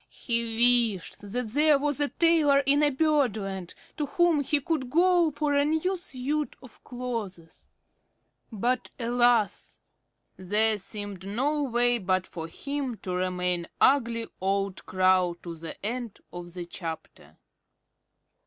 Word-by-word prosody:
He 235 Hz, -1 st, +2 dB
wished 180 Hz, -, -11 dB
that 245 Hz, 0 st, -2 dB
there 295 Hz, +4 st, +4 dB
was 290 Hz, 0 st, -1 dB
a 290 Hz, -, +3 dB
tailor 300 Hz, -4 st, +3 dB
in 280 Hz, +2 st, +4 dB, 0.2 s
Birdland 220 Hz, -, 0 dB, 0.2 s
to 295 Hz, -2 st, -2 dB
whom 345 Hz, 0 st, +2 dB
he 290 Hz, +2 st, +1 dB
could 280 Hz, -3 st, -2 dB
go 345 Hz, +2 st, +3 dB
for 295 Hz, 0 st, -1 dB
a 285 Hz, 0 st, +3 dB
new 320 Hz, +6 st, 0 dB
suit 300 Hz, -3 st, -4 dB
of 250 Hz, -, -16 dB
clothes. 225 Hz, -9 st, -7 dB, 0.8 s
But 235 Hz, +3 st, -1 dB
alas! 240 Hz, -3 st, +1 dB, 0.6 s
There 210 Hz, +3 st, +4 dB
seemed 200 Hz, -1 st, -6 dB
no 275 Hz, +9 st, 0 dB
way 245 Hz, -2 st, +2 dB
but 185 Hz, -1 st, 0 dB
for 165 Hz, -1 st, -7 dB
him 275 Hz, -, -4 dB
to 185 Hz, -, -4 dB
remain 180 Hz, -1 st, 0 dB
ugly 235 Hz, -4 st, +3 dB, 0.2 s
old 195 Hz, 0 st, -2 dB
Crow 185 Hz, -2 st, +2 dB
to 170 Hz, -, -6 dB
the 165 Hz, 0 st, -8 dB
end 235 Hz, -1 st, -4 dB, 0.2 s
of 175 Hz, 0 st, -9 dB
the 175 Hz, -1 st, -5 dB
chapter. 165 Hz, -2 st, -8 dB
235 Hz, 130 wpm, -27 LUFS, 190-285 Hz, 0.8 s, there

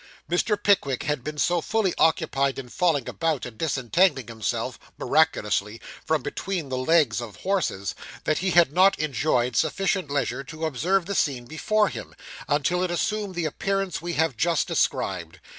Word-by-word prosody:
Mr. 190 Hz, +5 st, +1 dB
Pickwick 195 Hz, -11 st, +2 dB
had 145 Hz, -3 st, -2 dB
been 150 Hz, +1 st, -5 dB
so 175 Hz, +3 st, +2 dB
fully 215 Hz, 0 st, 0 dB
occupied 140 Hz, -4 st, +2 dB
in 130 Hz, -2 st, -7 dB
falling 155 Hz, -4 st, +1 dB
about, 160 Hz, -5 st, -1 dB
and 120 Hz, -2 st, -8 dB
disentangling 145 Hz, 0 st, +2 dB
himself, 110 Hz, -2 st, -3 dB, 0.2 s
miraculously, 110 Hz, -8 st, +1 dB, 0.2 s
from 155 Hz, -4 st, 0 dB
between 180 Hz, -3 st, -3 dB
the 130 Hz, -, -2 dB
legs 130 Hz, -5 st, +3 dB
of 110 Hz, -4 st, -8 dB
horses, 185 Hz, -, -1 dB, 0.3 s
that 155 Hz, -, +1 dB
he 190 Hz, -, 0 dB
had 170 Hz, -4 st, +4 dB
not 190 Hz, +3 st, +5 dB
enjoyed 130 Hz, -5 st, 0 dB
sufficient 185 Hz, -, 0 dB
leisure 140 Hz, -2 st, -1 dB
to 160 Hz, +2 st, -6 dB
observe 170 Hz, +6 st, +1 dB
the 200 Hz, -, -3 dB
scene 135 Hz, -9 st, 0 dB
before 210 Hz, -, +1 dB
him, -, -, -8 dB, 0.3 s
until 150 Hz, +5 st, +1 dB
it 185 Hz, -, 0 dB
assumed 195 Hz, +3 st, -2 dB
the 175 Hz, -2 st, -1 dB
appearance 195 Hz, +4 st, -2 dB
we 175 Hz, 0 st, -3 dB
have 160 Hz, -5 st, +1 dB
just 165 Hz, +6 st, +1 dB
described. 85 Hz, -1 st, -1 dB
155 Hz, 160 wpm, -25 LUFS, 130-180 Hz, 0.3 s, not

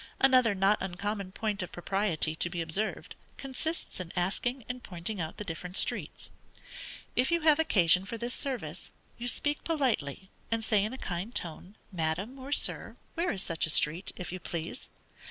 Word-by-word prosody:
Another 255 Hz, -5 st, +5 dB
not 195 Hz, +2 st, +4 dB
uncommon 195 Hz, +1 st, -3 dB
point 210 Hz, 0 st, -1 dB
of 180 Hz, -, -5 dB
propriety 175 Hz, -3 st, +1 dB
to 175 Hz, -, 0 dB
be 175 Hz, 0 st, -4 dB
observed, 170 Hz, +7 st, -2 dB, 0.2 s
consists 275 Hz, -, -4 dB
in 175 Hz, -2 st, -5 dB
asking 215 Hz, +7 st, -1 dB
and 250 Hz, 0 st, -4 dB
pointing 180 Hz, +1 st, -3 dB
out 160 Hz, 0 st, -4 dB
the -, -, -4 dB
different 180 Hz, 0 st, -3 dB
streets. -, -, +1 dB, 0.8 s
If 250 Hz, -, +3 dB
you 340 Hz, 0 st, +3 dB
have 310 Hz, -1 st, +5 dB
occasion 185 Hz, -, +5 dB
for 230 Hz, -, -5 dB
this 240 Hz, +2 st, -3 dB
service, 265 Hz, -3 st, -4 dB, 0.3 s
you 240 Hz, -, -3 dB
speak 290 Hz, +5 st, -1 dB
politely, 215 Hz, -, 0 dB, 0.2 s
and 230 Hz, -1 st, 0 dB
say 210 Hz, -3 st, +3 dB
in 215 Hz, -, -1 dB
a 260 Hz, -, -6 dB
kind 190 Hz, +3 st, -4 dB
tone, 175 Hz, +4 st, -2 dB, 0.2 s
Madam, 180 Hz, +9 st, -2 dB
or 265 Hz, +1 st, -8 dB
_Sir, 290 Hz, -, +2 dB, 0.2 s
where 340 Hz, +1 st, 0 dB
is 195 Hz, -, -1 dB
such 165 Hz, -1 st, +2 dB
a -, -, -2 dB
street, 155 Hz, +4 st, +4 dB
if 180 Hz, -, -5 dB
you 185 Hz, -, -4 dB
please? 170 Hz, -, -4 dB
200 Hz, 175 wpm, -30 LUFS, 175-250 Hz, 0.8 s, Another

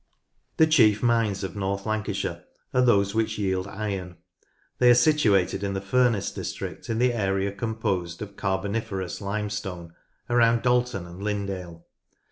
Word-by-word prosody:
The 160 Hz, -, +7 dB
chief 115 Hz, -10 st, +4 dB
mines 115 Hz, -5 st, +1 dB
of 95 Hz, -1 st, -5 dB
North 100 Hz, 0 st, -2 dB
Lancashire 110 Hz, -2 st, -2 dB, 0.3 s
are 125 Hz, -, +4 dB
those 100 Hz, -5 st, +3 dB
which 110 Hz, 0 st, 0 dB
yield 95 Hz, -2 st, -1 dB
iron: 95 Hz, -4 st, -5 dB, 0.6 s
they 125 Hz, -, +6 dB
are 120 Hz, -, +8 dB
situated 120 Hz, -, +3 dB
in 100 Hz, -1 st, -2 dB
the -, -, -1 dB
Furness 115 Hz, +1 st, +1 dB
district -, -, -6 dB
in 115 Hz, -, 0 dB
the 125 Hz, +1 st, +3 dB
area 100 Hz, -2 st, 0 dB
composed 100 Hz, -6 st, -2 dB
of 100 Hz, -1 st, -10 dB
Carboniferous 95 Hz, -1 st, -2 dB
Limestone 100 Hz, -4 st, -4 dB, 0.3 s
around 115 Hz, -1 st, +3 dB
Dalton 125 Hz, -6 st, +1 dB
and 85 Hz, +2 st, -11 dB
Lindale. 95 Hz, -5 st, -4 dB
100 Hz, 140 wpm, -25 LUFS, 95-115 Hz, 0.6 s, are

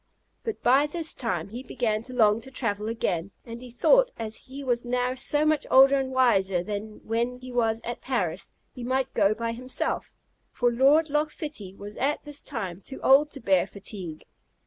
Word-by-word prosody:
But 450 Hz, -2 st, -5 dB
by 270 Hz, +4 st, +5 dB
this 320 Hz, +1 st, -2 dB
time 185 Hz, -8 st, -3 dB
he 235 Hz, +4 st, -6 dB
began 220 Hz, -4 st, -1 dB
to 255 Hz, -, -8 dB
long 220 Hz, -2 st, +4 dB
to 265 Hz, -, -11 dB
travel 215 Hz, -5 st, -2 dB
again; 190 Hz, -6 st, -1 dB, 0.2 s
and 230 Hz, 0 st, -8 dB
he 250 Hz, -, -10 dB
thought, -, -, +4 dB
as 220 Hz, -1 st, -4 dB
he 275 Hz, +4 st, -8 dB
was 245 Hz, -2 st, 0 dB
now 250 Hz, +1 st, 0 dB
so 295 Hz, +3 st, +1 dB
much 310 Hz, -1 st, +1 dB
older 270 Hz, +1 st, +7 dB
and 265 Hz, -1 st, -3 dB
wiser 195 Hz, -9 st, +3 dB
than 210 Hz, +2 st, -6 dB
when 235 Hz, +2 st, -1 dB
he 255 Hz, 0 st, -10 dB
was 225 Hz, -2 st, +1 dB
at 240 Hz, -, -5 dB
Paris, 195 Hz, -10 st, -2 dB, 0.2 s
he 250 Hz, -, -8 dB
might 260 Hz, +1 st, -1 dB
go 205 Hz, +2 st, +3 dB
by 230 Hz, +1 st, -2 dB
himself, 250 Hz, +3 st, -3 dB, 0.4 s
for 245 Hz, -, +1 dB
Lord 285 Hz, +6 st, +4 dB
Loch 300 Hz, +1 st, +1 dB
Fitty 295 Hz, -, -7 dB
was 205 Hz, +1 st, -10 dB
at 280 Hz, +3 st, 0 dB
this 295 Hz, -1 st, -3 dB
time 195 Hz, -, -5 dB
too 265 Hz, -, -8 dB
old 280 Hz, +3 st, +6 dB
to 275 Hz, -, -7 dB
bear 190 Hz, -5 st, +2 dB
fatigue. 195 Hz, -6 st, -7 dB
245 Hz, 190 wpm, -26 LUFS, 210-270 Hz, 0.4 s, older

